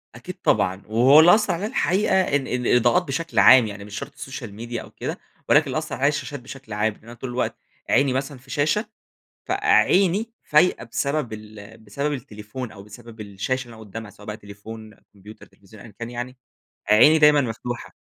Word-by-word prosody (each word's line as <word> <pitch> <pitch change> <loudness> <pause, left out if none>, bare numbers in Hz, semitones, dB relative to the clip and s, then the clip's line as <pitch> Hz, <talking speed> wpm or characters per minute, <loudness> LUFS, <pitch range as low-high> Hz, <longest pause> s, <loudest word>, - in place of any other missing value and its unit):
أكيد - - -8
طبعًا 95 +2 +1
وهو 125 +7 +6
اللي 175 +5 +8
أثر 215 - 0
عليَّ 185 +5 -3
الحقيقة 190 -4 +1
ال 145 -6 0
ال 125 -1 -2
الإضاءات 150 +9 +3
بشكل 165 +3 -2
عام، 125 -4 +7
يعني 100 -1 -8
مش 105 0 -8
شرط 140 - -8
السوشيال 130 -6 -8
ميديا 115 +2 -6
أو - - -13
كده، - - -5 0.3
ولكن - - +5
اللي - - -2
أثر - - -4
عليَّ 140 - +1
الشاشات 145 -1 -3
بشكل 125 -2 -10
عام، 105 0 0
إن - - -25
أنا 115 - -11
طول 125 +2 -7
الوقت 125 +1 -2 0.3
عيني 135 0 +3
مثلًا 135 +1 -3
في 130 +1 -20
شاشة 155 - 0 0.6
فعيني 195 +4 +3
فايقة 150 -4 +2
بسبب 140 +2 -2
ال 105 0 -11
بسبب 140 +8 -3
التليفون 110 -1 -7
أو 100 - -12
بسبب 110 +2 -13
الشاشة 105 +6 -3
اللي 120 -1 -13
أنا - - -13
قدامها 105 +1 -8
سواء 105 +2 -16
بقى 105 - -5
تليفون، 110 +1 -11 0.2
كمبيوتر، 105 +2 -14
تليفزيون 100 +1 -17
أيًا 110 - -14
كان 115 0 -6
يعني، 125 +1 -6 0.5
عيني 150 +9 +7
دايمًا 150 -1 +6
مفتوحة، 120 0 -5
120 Hz, 190 wpm, -23 LUFS, 110-145 Hz, 0.6 s, اللي